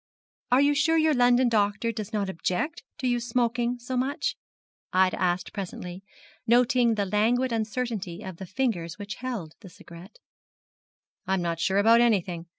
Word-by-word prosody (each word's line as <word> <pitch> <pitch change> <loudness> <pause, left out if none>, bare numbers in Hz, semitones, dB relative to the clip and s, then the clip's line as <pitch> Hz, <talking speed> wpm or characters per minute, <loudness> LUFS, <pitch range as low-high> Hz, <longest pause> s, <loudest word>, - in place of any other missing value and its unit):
'Are 255 +2 +5
you 285 +1 +4
sure 310 +3 +2
your 315 -1 +3
London 245 0 +4
doctor 215 0 +1
does 215 -1 -6
not 205 -3 -1
object 185 - -2 0.2
to 270 -4 -2
your 245 -1 +1
smoking 240 0 0
so 245 +2 -5
much?' 270 +5 -1 0.6
Ida 185 -1 +2
asked 180 0 0
presently, 180 -2 -6 0.5
noting 240 0 +4
the 205 -1 0
languid 230 +6 +1
uncertainty 220 -4 -3
of 190 -3 -7
the 190 - -8
fingers 185 -6 -2
which 205 -1 -7
held 225 -12 -5
the 195 - -12
cigarette. 170 +3 -14 1.1
'I 190 - +2
am 185 - -1
not 170 -1 -2
sure 190 +3 +1
about 225 +3 +6
anything. 180 -7 +1
220 Hz, 160 wpm, -26 LUFS, 190-245 Hz, 1.1 s, about